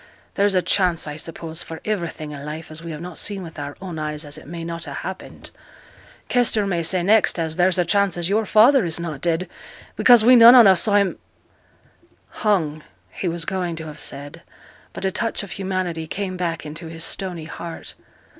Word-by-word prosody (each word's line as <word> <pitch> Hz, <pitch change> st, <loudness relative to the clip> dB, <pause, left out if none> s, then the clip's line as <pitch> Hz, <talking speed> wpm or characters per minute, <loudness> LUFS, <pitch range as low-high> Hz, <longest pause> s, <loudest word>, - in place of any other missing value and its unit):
'There's 200 Hz, 0 st, +2 dB
a 180 Hz, -, +2 dB
chance, 180 Hz, -4 st, +2 dB
I 150 Hz, -1 st, -6 dB
suppose, 160 Hz, +1 st, -6 dB
for 160 Hz, -1 st, -7 dB
iverything 170 Hz, -7 st, -3 dB
i' 140 Hz, -, -9 dB
life 155 Hz, +2 st, -7 dB
as 155 Hz, +1 st, -6 dB
we 170 Hz, -, -7 dB
have 155 Hz, -1 st, -6 dB
not 180 Hz, -1 st, -6 dB
seen 200 Hz, -2 st, -2 dB
with 165 Hz, -3 st, -10 dB
our 145 Hz, 0 st, -6 dB
own 180 Hz, -4 st, -6 dB
eyes 150 Hz, 0 st, -4 dB
as 145 Hz, 0 st, -6 dB
it 155 Hz, -, -10 dB
may 170 Hz, +1 st, -7 dB
not 170 Hz, 0 st, -5 dB
ha' 145 Hz, -, -7 dB
happened. 190 Hz, +1 st, -8 dB, 0.8 s
Kester 235 Hz, -4 st, +2 dB
may 175 Hz, -4 st, -1 dB
say 175 Hz, +2 st, 0 dB
next 215 Hz, +2 st, +3 dB
as 160 Hz, -1 st, -2 dB
there's 180 Hz, +1 st, +2 dB
a 180 Hz, -, +2 dB
chance 200 Hz, 0 st, +1 dB
as 170 Hz, -1 st, -1 dB
your 210 Hz, +2 st, 0 dB
father 235 Hz, +6 st, +5 dB
is 170 Hz, -1 st, -1 dB
not 160 Hz, -5 st, -5 dB
dead, 170 Hz, +1 st, 0 dB, 0.5 s
because 240 Hz, -3 st, +6 dB
we 250 Hz, +1 st, +8 dB
none 235 Hz, +1 st, +9 dB
on 240 Hz, -3 st, +9 dB
us 190 Hz, -3 st, +6 dB
saw 205 Hz, -2 st, +2 dB
him 200 Hz, -2 st, +2 dB, 0.6 s
' -, -, -35 dB
'Hung,' 165 Hz, -8 st, 0 dB, 0.3 s
he 185 Hz, -, -4 dB
was 170 Hz, -1 st, -2 dB
going 180 Hz, -2 st, -2 dB
to 160 Hz, 0 st, -7 dB
have 155 Hz, -1 st, -9 dB
said, 145 Hz, +4 st, -4 dB, 0.5 s
but -, -, -6 dB
a 190 Hz, -, +1 dB
touch 225 Hz, +2 st, -2 dB
of 200 Hz, -, -10 dB
humanity 185 Hz, -3 st, -3 dB
came 190 Hz, +2 st, -4 dB
back 170 Hz, -3 st, -3 dB
into 155 Hz, +3 st, -8 dB
his 165 Hz, 0 st, -5 dB
stony 175 Hz, -2 st, -4 dB
heart. 165 Hz, +1 st, -8 dB
175 Hz, 210 wpm, -22 LUFS, 160-195 Hz, 0.8 s, none